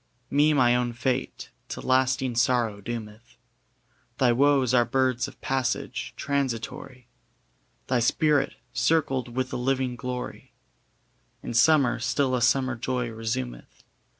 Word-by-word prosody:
] 125 Hz, 0 st, -43 dB
Me 145 Hz, +2 st, +4 dB
my 125 Hz, -4 st, +4 dB
own 125 Hz, -1 st, 0 dB
fate 125 Hz, +2 st, -3 dB, 0.2 s
to -, -, -5 dB
lasting 130 Hz, 0 st, +1 dB
sorrow 120 Hz, -4 st, +1 dB
doometh: 115 Hz, +1 st, -8 dB, 0.8 s
Thy 125 Hz, -2 st, +4 dB
woes 135 Hz, 0 st, +3 dB
are 120 Hz, -1 st, +5 dB
birds 130 Hz, 0 st, 0 dB
of -, -, -13 dB
passage, 130 Hz, -3 st, -2 dB
transitory: 130 Hz, -2 st, -3 dB, 0.8 s
Thy 125 Hz, -1 st, +1 dB
spirit, 145 Hz, +5 st, +2 dB, 0.2 s
circled 130 Hz, -7 st, 0 dB
with 130 Hz, 0 st, -2 dB
a -, -, -1 dB
living 130 Hz, 0 st, -1 dB
glory, 125 Hz, -1 st, -6 dB, 0.9 s
In -, -, -5 dB
summer 135 Hz, 0 st, +4 dB
still 130 Hz, +3 st, 0 dB
a 125 Hz, -, 0 dB
summer 130 Hz, +2 st, +2 dB
joy 125 Hz, 0 st, -2 dB
resumeth. 85 Hz, -, -5 dB
125 Hz, 125 wpm, -26 LUFS, 120-135 Hz, 0.9 s, are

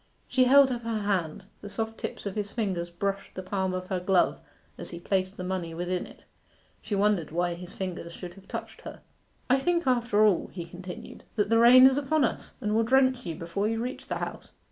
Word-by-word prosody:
She 255 Hz, 0 st, +3 dB
held 270 Hz, +1 st, +7 dB
up 240 Hz, -1 st, -2 dB
her 230 Hz, -2 st, -2 dB
hand. 185 Hz, -6 st, -1 dB, 0.2 s
The 205 Hz, -, -8 dB
soft 225 Hz, +2 st, -4 dB
tips -, -, -5 dB
of 200 Hz, -, -3 dB
his 205 Hz, -1 st, -3 dB
fingers 190 Hz, -7 st, -2 dB
brushed 195 Hz, +3 st, -3 dB
the 185 Hz, -, -5 dB
palm 190 Hz, 0 st, -1 dB
of 185 Hz, 0 st, -5 dB
her 185 Hz, -, 0 dB
glove 180 Hz, 0 st, +2 dB, 0.4 s
as -, -, -7 dB
he 170 Hz, -, -7 dB
placed 190 Hz, +2 st, -1 dB
the 185 Hz, -, -5 dB
money 180 Hz, -3 st, -3 dB
within 180 Hz, +1 st, -2 dB
it. -, -, -16 dB, 0.6 s
She 205 Hz, -, -3 dB
wondered 200 Hz, -5 st, +2 dB
why 175 Hz, +2 st, 0 dB
his 175 Hz, +1 st, -9 dB
fingers 180 Hz, -3 st, -5 dB
should 175 Hz, 0 st, -8 dB
have 195 Hz, +1 st, -17 dB
touched -, -, -7 dB
her. -, -, -9 dB, 0.5 s
'I 260 Hz, +1 st, +4 dB
think 345 Hz, +3 st, +1 dB
after 235 Hz, -4 st, +3 dB
all,' 200 Hz, -5 st, +2 dB
he 175 Hz, -2 st, -6 dB
continued, 180 Hz, +1 st, -9 dB
'that 205 Hz, -2 st, +1 dB
the 230 Hz, -, +5 dB
rain 250 Hz, +2 st, +9 dB
is 265 Hz, +1 st, +5 dB
upon 290 Hz, +1 st, +1 dB
us, -, -, -4 dB
and 210 Hz, 0 st, -1 dB
will 225 Hz, -, +3 dB
drench 260 Hz, -1 st, +3 dB
you 165 Hz, -, -3 dB
before 170 Hz, +6 st, -2 dB
you 225 Hz, 0 st, -1 dB
reach 250 Hz, +3 st, -5 dB
the -, -, -2 dB
House. -, -, -6 dB
200 Hz, 220 wpm, -28 LUFS, 180-235 Hz, 0.6 s, rain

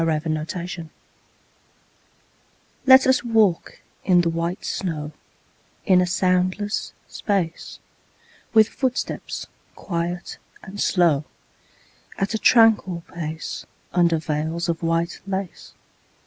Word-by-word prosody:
VELVET 155 Hz, -1 st, -1 dB
SHOES 175 Hz, -1 st, -5 dB, 2.0 s
Let 265 Hz, 0 st, +8 dB
us 260 Hz, -1 st, +3 dB
walk 220 Hz, -7 st, +1 dB, 0.2 s
in 180 Hz, -2 st, +4 dB
the 170 Hz, -1 st, 0 dB
white 170 Hz, +2 st, -3 dB
snow 155 Hz, -5 st, -3 dB, 0.7 s
In 185 Hz, -2 st, +5 dB
a 180 Hz, -, +1 dB
soundless 185 Hz, +3 st, 0 dB
space; 185 Hz, -5 st, -3 dB, 0.7 s
With 220 Hz, -1 st, +6 dB
footsteps 260 Hz, -1 st, -3 dB, 0.3 s
quiet 175 Hz, 0 st, -4 dB, 0.2 s
and 200 Hz, +2 st, -7 dB
slow, 165 Hz, -6 st, +2 dB, 0.9 s
At 195 Hz, +3 st, -1 dB
a 220 Hz, -, -1 dB
tranquil 215 Hz, -8 st, +4 dB
pace, 160 Hz, -1 st, -5 dB, 0.3 s
Under 170 Hz, -2 st, +3 dB
veils 160 Hz, +2 st, -2 dB
of 165 Hz, -1 st, -2 dB
white 165 Hz, +1 st, -1 dB
lace. 190 Hz, -2 st, -5 dB
175 Hz, 100 wpm, -23 LUFS, 165-200 Hz, 2.0 s, Let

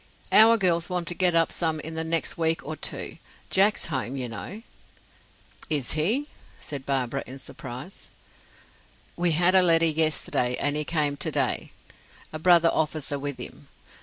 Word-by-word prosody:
"Our 225 Hz, +1 st, +7 dB
girls 175 Hz, -4 st, +1 dB
want 180 Hz, -2 st, -3 dB
to -, -, -2 dB
get 180 Hz, -1 st, +2 dB
up 165 Hz, 0 st, +3 dB
some 160 Hz, -2 st, -1 dB
in 160 Hz, +2 st, -7 dB
the 160 Hz, 0 st, -2 dB
next 165 Hz, 0 st, -1 dB
week 165 Hz, -1 st, -1 dB
or 155 Hz, -, -5 dB
two. -, -, -5 dB, 0.3 s
Jack's 200 Hz, +3 st, +4 dB
home, 130 Hz, -4 st, -3 dB
you 130 Hz, -2 st, -3 dB
know." 180 Hz, -, -8 dB, 1.1 s
"Is 145 Hz, -6 st, +2 dB
he?" 215 Hz, -, 0 dB, 0.3 s
said 140 Hz, -3 st, -8 dB
Barbara, 135 Hz, -1 st, -1 dB
in 130 Hz, -, -9 dB
surprise. 135 Hz, -, -9 dB, 1.1 s
"We 175 Hz, -1 st, +1 dB
had 175 Hz, +3 st, +4 dB
a 190 Hz, -, +6 dB
letter 165 Hz, -2 st, +4 dB
yesterday, 155 Hz, -6 st, +1 dB
and 145 Hz, +1 st, 0 dB
he 150 Hz, 0 st, -1 dB
came 150 Hz, -3 st, 0 dB
to -, -, -2 dB
day -, -, -1 dB, 0.6 s
a 155 Hz, -, -5 dB
brother 170 Hz, 0 st, +5 dB
officer 150 Hz, -2 st, -2 dB
with 145 Hz, -1 st, -4 dB
him. -, -, -10 dB
160 Hz, 165 wpm, -25 LUFS, 145-175 Hz, 1.1 s, Our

